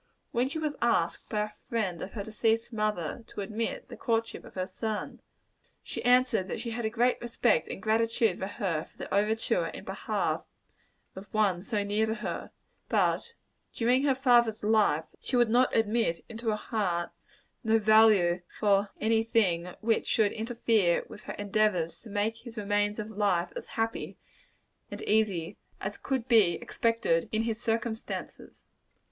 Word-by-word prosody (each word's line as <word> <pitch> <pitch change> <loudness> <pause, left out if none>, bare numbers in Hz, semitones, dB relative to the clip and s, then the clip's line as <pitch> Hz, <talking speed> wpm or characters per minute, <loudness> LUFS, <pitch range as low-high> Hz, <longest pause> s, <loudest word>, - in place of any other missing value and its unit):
When 245 +3 +1
she 300 - -4
was 305 -2 -2
asked 175 -8 +1
by 210 -2 0
a 210 - -4
friend 210 -5 -3
of 195 - -6
her 205 - -4
deceased 225 +2 0
mother 215 -1 -2
to - - -6
admit 215 +3 -3
the - - -9
courtship 230 -1 -1
of - - -14
her 185 -1 -1
son, 215 +2 -4 0.6
she - - -6
answered 245 -5 +4
that - - -4
she 235 - -4
had 235 0 -3
a - - +1
great 245 +3 +1
respect 240 -1 +1
and - - -6
gratitude 225 -1 +1
to 190 - -2
her 185 -6 -2
for - - -28
the - - -6
overture 220 - +1
in - - -8
behalf - - -1 0.7
of 190 +2 -10
one 200 -5 +2
so 210 0 -1
near 210 +2 +1
to 220 - -1
her; - - -5 0.4
but - - +3
that 470 - -13 0.4
during 245 +3 +2
her 275 -2 +3
father's 240 -5 +3
life, 210 -8 +3
she - - -3
would 240 -2 +3
admit 225 -7 +2
into 230 0 -4
her 215 - +2
heart 190 -6 -2 0.5
no 225 -1 +4
value 215 -5 +5 0.2
for 200 -1 +3
any 225 +1 +3
thing 180 -6 +1
which 225 0 +1
should 210 -3 +3
interfere 225 -5 +1
with 210 - -11
her - - -5
endeavors 200 -5 0
to 230 - -12
make 210 +2 -1
his 235 0 -11
remains 205 0 0
of 215 0 -5
life 195 -4 0
as - - -6
happy 225 0 -2 0.7
and - - -7
easy 200 -6 +1 0.2
as - - -5
could 260 -3 -2
be 215 -8 +5
expected 230 -8 0
in 220 +1 +1
his 225 0 -2
circumstances. 230 -1 -4
220 Hz, 165 wpm, -29 LUFS, 200-230 Hz, 0.7 s, value